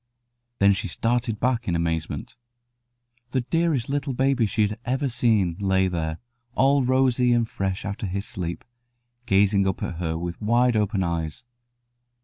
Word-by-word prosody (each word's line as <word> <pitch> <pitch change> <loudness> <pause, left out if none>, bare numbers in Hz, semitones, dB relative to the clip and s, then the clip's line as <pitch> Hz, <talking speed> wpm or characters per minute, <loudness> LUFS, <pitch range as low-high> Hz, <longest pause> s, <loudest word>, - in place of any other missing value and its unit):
Then 100 0 +5
she 105 +2 -3
started 115 +3 -1
back 125 -1 0
in 85 - +1
amazement. 80 -1 -2 1.0
The 130 - +2
dearest 160 -2 0
little 140 0 -2
baby 130 -2 +2
she 105 +2 +1
had 105 +1 -1
ever 130 +3 -1
seen 110 -8 +1
lay 95 -1 +2
there, 80 -3 -2 0.4
all 135 0 +4
rosy 125 -1 +3
and 120 -1 +2
fresh 95 -3 -3
after 100 +1 -3
his 100 +2 -3
sleep, 85 -2 -5 0.6
gazing 100 0 +3
up 95 - -2
at 85 - -4
her 80 -2 -2
with 85 +3 -5
wide 120 +3 +3
open 105 -2 +1
eyes. 85 +4 -3
105 Hz, 150 wpm, -24 LUFS, 95-125 Hz, 1.0 s, Then